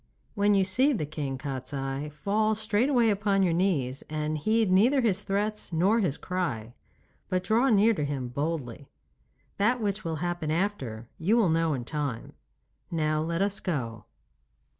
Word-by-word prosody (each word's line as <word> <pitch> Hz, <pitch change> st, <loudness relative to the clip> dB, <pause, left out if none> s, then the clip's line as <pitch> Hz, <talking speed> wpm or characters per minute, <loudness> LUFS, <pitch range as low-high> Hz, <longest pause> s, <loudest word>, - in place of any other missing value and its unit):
When 205 Hz, -1 st, +3 dB
you 195 Hz, -, +4 dB
see 255 Hz, +10 st, +3 dB
the 180 Hz, -, -1 dB
King 145 Hz, -3 st, -4 dB
Kostiei, 135 Hz, +1 st, -4 dB
fall 210 Hz, +8 st, 0 dB
straightway 225 Hz, +3 st, +2 dB
upon 200 Hz, -1 st, +1 dB
your 175 Hz, -3 st, +2 dB
knees 150 Hz, -8 st, 0 dB
and 155 Hz, 0 st, -2 dB
heed 215 Hz, +6 st, +1 dB
neither 240 Hz, +9 st, +4 dB
his 210 Hz, -5 st, +1 dB
threats 210 Hz, 0 st, -2 dB
nor 190 Hz, +8 st, +3 dB
his 175 Hz, -9 st, 0 dB
cry, 125 Hz, -12 st, -3 dB, 0.6 s
but 185 Hz, -1 st, 0 dB
draw 235 Hz, +6 st, +3 dB
near 220 Hz, 0 st, +5 dB
to 155 Hz, -, -2 dB
him 140 Hz, -3 st, -3 dB
boldly. 140 Hz, -2 st, -4 dB, 0.7 s
That 235 Hz, +5 st, +2 dB
which 205 Hz, -1 st, -2 dB
will 165 Hz, -2 st, -2 dB
happen 175 Hz, -1 st, -3 dB
after, 155 Hz, -, -2 dB
you 205 Hz, +8 st, +2 dB
will 215 Hz, -7 st, +3 dB
know 165 Hz, -1 st, +2 dB
in 120 Hz, -2 st, -5 dB
time. 145 Hz, -5 st, -4 dB, 0.6 s
Now 155 Hz, -2 st, 0 dB
let 165 Hz, +3 st, 0 dB
us 200 Hz, 0 st, -1 dB
go. 115 Hz, -, -3 dB
175 Hz, 160 wpm, -28 LUFS, 145-205 Hz, 0.7 s, near